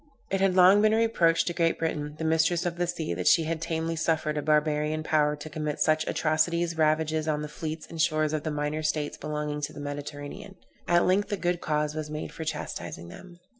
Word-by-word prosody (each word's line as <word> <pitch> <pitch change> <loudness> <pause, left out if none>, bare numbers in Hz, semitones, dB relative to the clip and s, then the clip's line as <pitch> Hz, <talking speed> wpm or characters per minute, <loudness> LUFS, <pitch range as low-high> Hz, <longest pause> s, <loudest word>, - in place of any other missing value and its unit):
It 195 0 0
had 195 -1 +3
long 190 +3 +7
been 215 0 +4
a - - +3
reproach 180 -8 +3
to 175 - -1
Great 165 -1 +1
Britain, 150 -2 -3
the 160 - -5
mistress 160 +2 +2
of 170 -1 -2
the 175 0 0
sea, 170 - -3
that 90 +1 -3
she 165 - +6
had 160 0 -3
tamely 165 0 -2
suffered 155 -1 0
a 150 - -1
barbarian 150 +1 +1
power 150 -1 +2
to 145 +1 -9
commit 150 -1 -4
such 155 0 +2
atrocious 170 +2 +1
ravages 155 0 +1
on 150 -1 0
the - - -4
fleets 155 +1 -6
and 165 -1 -4
shores 155 -1 +1
of 155 - -1
the 155 - -3
minor 150 +1 -2
states 150 -1 -2
along 150 -1 -3
the 145 0 -5
Mediterranean. 145 +5 -7 0.3
At 175 0 +4
length 200 +4 +2
a 205 - 0
good 175 -1 -1
cause 150 -1 0
was 155 -1 -5
made 150 0 -5
for 160 - -6
chastising 85 - -5
them. 175 - -13
155 Hz, 215 wpm, -27 LUFS, 150-170 Hz, 0.3 s, long